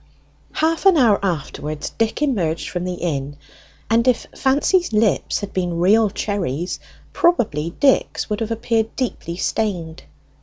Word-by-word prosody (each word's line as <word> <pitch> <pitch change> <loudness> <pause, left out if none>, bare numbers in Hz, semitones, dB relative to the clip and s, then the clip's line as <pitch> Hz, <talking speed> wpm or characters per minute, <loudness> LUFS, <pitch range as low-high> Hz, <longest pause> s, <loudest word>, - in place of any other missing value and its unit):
Half 325 +4 +1
an 375 -4 +6
hour 220 -7 +4
afterwards 155 -3 -3
Dick 225 +6 -1
emerged 180 - -1
from 180 0 -3
the 180 0 -3
inn, 145 -5 -3 0.5
and 230 +3 +2
if 250 -2 +2
Fancy's 295 +6 +2
lips 215 -1 +1
had 205 - -6
been 175 -2 -1
real 210 +5 +4
cherries 180 -6 -3 0.3
probably 190 - +1
Dick's 275 -2 +2
would 210 -1 -2
have 225 -1 -2
appeared 225 -1 -1
deeply 200 -9 -3
stained. 180 -6 -2
210 Hz, 140 wpm, -21 LUFS, 170-235 Hz, 0.5 s, an